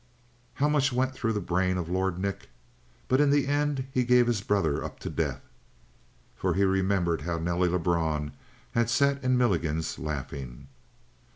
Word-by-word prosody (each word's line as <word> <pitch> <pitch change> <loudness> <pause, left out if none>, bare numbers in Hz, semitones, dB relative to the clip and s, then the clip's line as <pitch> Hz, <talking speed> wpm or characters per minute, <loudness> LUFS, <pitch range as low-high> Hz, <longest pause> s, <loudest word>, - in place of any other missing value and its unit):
How 145 +2 +2
much 145 -3 +2
went 130 +1 0
through 115 -3 -1
the 105 - -1
brain 90 0 0
of 85 -2 -3
Lord 95 0 -1
Nick? 100 +1 -4 0.6
But 130 +2 +3
in 145 - +4
the 145 0 +3
end 145 -1 0
he 130 -1 +1
gave 125 0 +5
his 120 -4 0
brother 95 -8 0
up - - -7
to - - -4
death. - - -2 0.9
For - - -1
he 100 - +2
remembered 95 -4 +1
how 85 +2 -2
Nelly 85 +2 0
Lebrun 80 -4 0 0.4
had 115 -1 +1
sat 140 +2 +2
in 130 0 +2
Milligan's 80 -9 0
laughing. 70 -3 -6
95 Hz, 165 wpm, -28 LUFS, 85-130 Hz, 0.9 s, gave